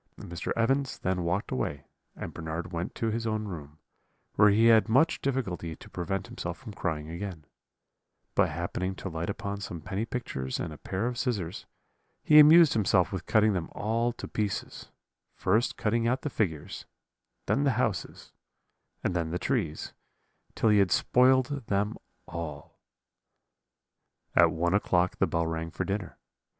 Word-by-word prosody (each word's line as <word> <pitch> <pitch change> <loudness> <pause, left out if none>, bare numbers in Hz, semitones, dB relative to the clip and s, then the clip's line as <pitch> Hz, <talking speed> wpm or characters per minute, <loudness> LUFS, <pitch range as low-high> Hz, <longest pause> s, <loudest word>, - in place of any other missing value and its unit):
"Mr. 85 -1 -5
Evans 135 +4 +1
then 90 0 -1
walked 85 +4 -1
away, 70 +2 -2 0.3
and - - -7
Bernard 85 +2 -5
went 85 +1 -3
to 115 -1 -1
his 115 +1 -2
own 110 -1 -1
room, 75 -6 -8 0.6
where 105 0 +6
he 110 +3 +4
had 115 -1 +6
much 145 +9 +3
difficulty 95 -12 -2
to - - -15
prevent 95 +2 -3
himself - - -5
from - - -10
crying 75 -1 -3
again; 85 -2 -6 0.9
but - - +3
happening 90 +2 -3
to 95 - -6
light 80 +1 -4
upon 100 0 -4
some 90 -4 -5
penny 95 +6 -3
pictures 65 - -4
and 80 - -4
a 75 - -12
pair 95 +4 -3
of 125 0 -2
scissors, 100 -10 -2 0.6
he 150 0 +7
amused 155 +1 +8
himself 95 -4 +2
with 95 - -5
cutting 110 -1 +4
them 90 -4 -3
all 115 +3 0
to 120 - -8
pieces; 105 -2 -3 0.5
first 110 +6 +1
cutting 115 +2 +1
out 130 +2 0
the 150 - -2
figures, 90 -5 -3 0.6
then 140 - +1
the 140 -3 +3
houses, - - -2 0.7
and 90 - 0
then 85 -2 0
the 85 - -1
trees, 90 - -2 0.6
till 115 - +2
he 105 -1 +5
had 100 -2 +4
spoiled 130 +2 +3
them 105 +1 0 0.3
all. 80 -4 -7 1.6
"At - - +7
one 85 +2 0
o'clock 90 -3 +2
the - - +2
bell 85 0 0
rang 80 0 -3
for - - -3
dinner. 100 -2 -4
100 Hz, 160 wpm, -28 LUFS, 85-115 Hz, 1.6 s, amused